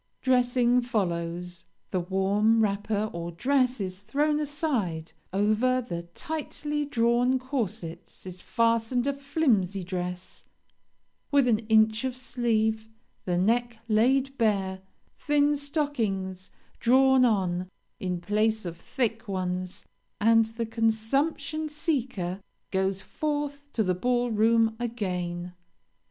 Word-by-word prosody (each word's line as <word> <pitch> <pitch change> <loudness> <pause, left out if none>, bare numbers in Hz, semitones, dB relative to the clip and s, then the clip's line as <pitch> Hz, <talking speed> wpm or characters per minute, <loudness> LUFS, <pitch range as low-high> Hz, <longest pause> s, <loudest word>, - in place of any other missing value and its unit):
Dressing 250 -1 +3
follows; 175 -6 -2 0.3
the 185 - +1
warm 195 +5 +2
wrapper 210 +1 0
or 170 0 -4
dress 255 +6 +1
is 185 -2 -4
thrown 295 +8 0
aside; 265 - -2 0.2
over 215 +6 +2
the 175 -9 -4
tightly 300 -2 -3
drawn 245 -1 +2
corsets 235 - -5
is 185 -1 -8
fastened 230 +1 +1
a 280 - +1
flimsy 260 - 0
dress, 180 0 -5 0.9
with 280 -3 +4
an 220 -3 +3
inch 220 +1 +4
of 260 -1 -2
sleeve; 220 -3 0 0.4
the 180 -1 0
neck 235 +5 +1
laid 260 +5 +2
bare; 195 -4 +1 0.4
thin 295 0 +3
stockings 230 - -2 0.3
drawn 265 +1 +5
on, 185 -6 +1 0.3
in 180 -4 -2
place 215 +2 +1
of 170 -1 -5
thick 230 +1 -2
ones, 185 -1 -3 0.3
and 225 +1 +5
the 225 +1 -4
consumption 275 +8 0
seeker 255 - -2 0.3
goes 190 0 0
forth 290 -1 -3
to 220 - +1
the 185 -2 +1
ball 245 +5 0
room 225 +1 +3
again. 180 -7 -3
225 Hz, 115 wpm, -27 LUFS, 190-260 Hz, 0.9 s, drawn